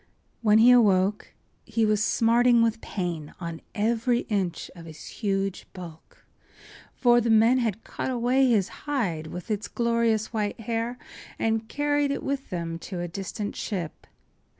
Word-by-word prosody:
When 215 -2 +5
he 235 +3 +7
awoke 205 -4 +3 0.3
he 225 -1 0
was 215 0 +2
smarting 235 +2 +4
with 230 0 0
pain 170 -6 -4
on 170 -2 -6
every 235 +3 +1
inch 190 -5 -2
of 165 -1 -11
his 155 -1 -11
huge 195 -2 -2
bulk, 170 -4 -12 0.7
for 240 -1 +4
the 235 - -1
men 225 +3 +5
had 225 -3 -2
cut - - -4
away 255 +2 +2
his 210 -6 +3 0.2
hide 180 - -1
with 180 +6 -7
its 210 0 -2
glorious 230 -2 0
white 210 0 -2
hair 230 +2 -2 0.4
and 225 0 -1
carried 290 +1 +1
it 280 - -2
with 275 0 -3
them 165 -2 -4
to 180 +1 -6
a 175 - -3
distant 195 +4 -5
ship. 180 -7 -5
220 Hz, 150 wpm, -26 LUFS, 185-235 Hz, 0.7 s, he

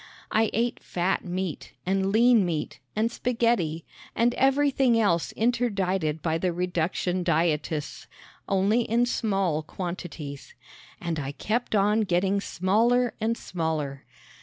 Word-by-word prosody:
I 220 0 +3
ate 235 +2 -1
fat 180 +2 -1
meat 180 -2 -4
and 190 +1 +1
lean 230 0 +5
meat 165 -4 -3 0.2
and 225 +2 +1
spaghetti, 230 -11 0 0.3
and 235 +1 +3
everything 270 -3 +3
else 170 -6 +1
interdicted 195 -9 0
by 160 -1 0
the 180 +1 0
reduction 180 +1 -1
dietists 160 -3 -1 0.4
only 200 +4 +3
in 235 +1 +2
small 195 -9 0
quantities! 165 -4 -7 0.4
And 170 -3 -3
I 140 -1 -4
kept 220 +8 -1
on 210 +2 +3
getting 195 0 +1
smaller 230 +7 +2
and 230 +1 0
smaller. 155 -6 -3
190 Hz, 120 wpm, -26 LUFS, 170-230 Hz, 0.4 s, lean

